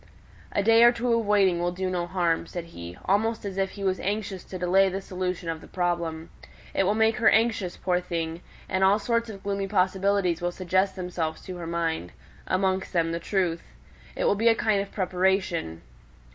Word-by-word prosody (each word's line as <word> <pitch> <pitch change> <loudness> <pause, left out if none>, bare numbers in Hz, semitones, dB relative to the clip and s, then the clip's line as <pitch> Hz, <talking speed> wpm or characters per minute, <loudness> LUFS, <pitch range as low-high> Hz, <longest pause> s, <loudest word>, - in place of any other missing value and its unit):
"A 205 - 0
day 225 +2 +6
or 240 - +8
two 240 0 0
of 230 -2 +1
waiting 195 -4 +3
will 175 0 0
do 185 +1 -3
no 180 -1 -2
harm," 170 -2 0
said 175 - -5
he, 85 +1 -8
almost 220 +3 +1
as 195 -2 -4
if 195 0 0
he 200 - -5
was 190 -1 0
anxious 200 -2 -3
to 185 - -7
delay 185 +2 +3
the 190 +1 -3
solution 185 -2 -4
of 165 -1 -3
the - - -13
problem. 170 -2 -2 0.4
"It 195 - +2
will 205 +3 +2
make 220 0 +3
her 225 - +5
anxious, 220 -5 +1
poor 180 -1 +1
thing, 165 -1 -4 0.3
and 190 0 0
all 195 +2 +5
sorts 230 +1 -1
of 195 -3 -9
gloomy 200 -1 -2
possibilities 190 -2 +1
will 175 0 0
suggest 185 +2 0
themselves 180 -4 -3
to 185 -1 -7
her 170 -1 -6
mind 165 - -2 0.3
amongst 190 0 0
them 165 -2 +1
the 170 - -2
truth; 175 -2 -1 0.5
it - - -2
will - - +4
be 220 +3 +1
a 230 - +6
kind 215 -3 +1
of 200 - -7
preparation." 185 - 0
185 Hz, 200 wpm, -26 LUFS, 175-200 Hz, 0.5 s, or